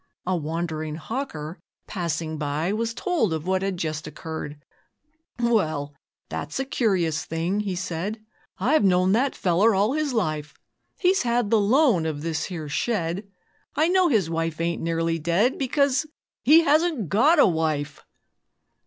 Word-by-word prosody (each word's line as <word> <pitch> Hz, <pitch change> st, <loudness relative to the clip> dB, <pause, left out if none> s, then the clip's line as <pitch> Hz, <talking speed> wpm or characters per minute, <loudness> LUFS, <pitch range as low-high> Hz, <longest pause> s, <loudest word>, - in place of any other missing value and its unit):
A 185 Hz, 0 st, +1 dB
wandering 160 Hz, -1 st, -3 dB
hawker 165 Hz, -, -5 dB, 0.3 s
passing 165 Hz, -4 st, -3 dB
by 150 Hz, +5 st, -1 dB
Was 230 Hz, +1 st, -2 dB
told 325 Hz, -, 0 dB
of 160 Hz, 0 st, -3 dB
what 190 Hz, 0 st, +1 dB
had 195 Hz, -1 st, -2 dB
just 155 Hz, -2 st, -3 dB
occurred. 150 Hz, -1 st, -7 dB, 0.8 s
'Well! 160 Hz, -12 st, 0 dB, 0.3 s
that's 145 Hz, -, -5 dB
a 270 Hz, -, -1 dB
curious 190 Hz, -, 0 dB
thing,' 170 Hz, +5 st, -2 dB
he 200 Hz, -3 st, -2 dB
said, 190 Hz, +4 st, -3 dB, 0.4 s
'I've 260 Hz, +9 st, +2 dB
known 185 Hz, -1 st, +3 dB
that 255 Hz, +6 st, +2 dB
feller 195 Hz, +5 st, +3 dB
all 205 Hz, +6 st, +2 dB
his 305 Hz, -1 st, 0 dB
life 155 Hz, -10 st, -2 dB, 0.4 s
He's 375 Hz, +1 st, +3 dB
had 235 Hz, -3 st, 0 dB
the 225 Hz, -, +5 dB
loan 220 Hz, -, +3 dB
of 150 Hz, -2 st, -4 dB
this 160 Hz, -1 st, -2 dB
here 165 Hz, -5 st, -6 dB
shed! 185 Hz, +2 st, -2 dB, 0.5 s
I 315 Hz, +2 st, +3 dB
know 370 Hz, 0 st, +4 dB
his 220 Hz, -, +2 dB
wife 165 Hz, -1 st, -2 dB
ain't 170 Hz, 0 st, -1 dB
nearly 165 Hz, 0 st, 0 dB
dead, 175 Hz, -, +1 dB
Because 280 Hz, +2 st, +1 dB, 0.3 s
he 315 Hz, +6 st, +6 dB
HASN'T 310 Hz, -, +2 dB
GOT 265 Hz, -, +4 dB
A 290 Hz, -, +7 dB
WIFE!' 155 Hz, -4 st, -1 dB
185 Hz, 150 wpm, -24 LUFS, 160-235 Hz, 0.8 s, A